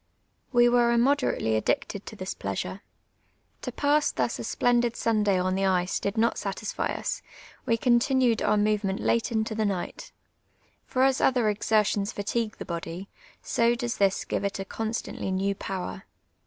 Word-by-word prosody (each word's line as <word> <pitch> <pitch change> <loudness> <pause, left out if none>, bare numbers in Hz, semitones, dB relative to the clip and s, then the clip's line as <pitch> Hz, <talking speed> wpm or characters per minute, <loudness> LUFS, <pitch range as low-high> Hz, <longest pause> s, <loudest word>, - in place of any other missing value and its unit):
We 240 -2 +5
were 240 -1 +4
immoderately 240 - +2
addicted 190 - -1
to - - -7
tlus 185 -2 -4
pleasure. - - -4 0.8
To - - -4
pass 290 +1 +2
thus - - -1
a - - -4
splendid 240 -1 +1
Sunday 210 -4 +2
on 185 +1 0
the 195 +1 +1
ice 180 -1 +1
did 200 +2 -3
not 230 +1 +2
satisfy 200 +2 -3
us, - - -3 0.5
we 230 -2 +3
continued 245 0 +3
our 210 0 +2
movement 205 -2 +1
late 235 +1 +1
into 220 -1 0
the 220 0 0
night. 195 -4 -3 0.8
For 260 -1 +1
as 270 0 +3
other 245 -5 +3
exertions 210 -1 +1
fatigue 215 +2 -2
the - - -7
body, 170 +2 -5 0.3
so 235 +1 +2
does 240 0 -3
this 195 -1 +2
give - - -2
it 200 0 -1
a 195 - -4
constantly 220 -1 -4
new 190 +1 0
power. 190 0 -5
215 Hz, 160 wpm, -27 LUFS, 195-240 Hz, 0.8 s, We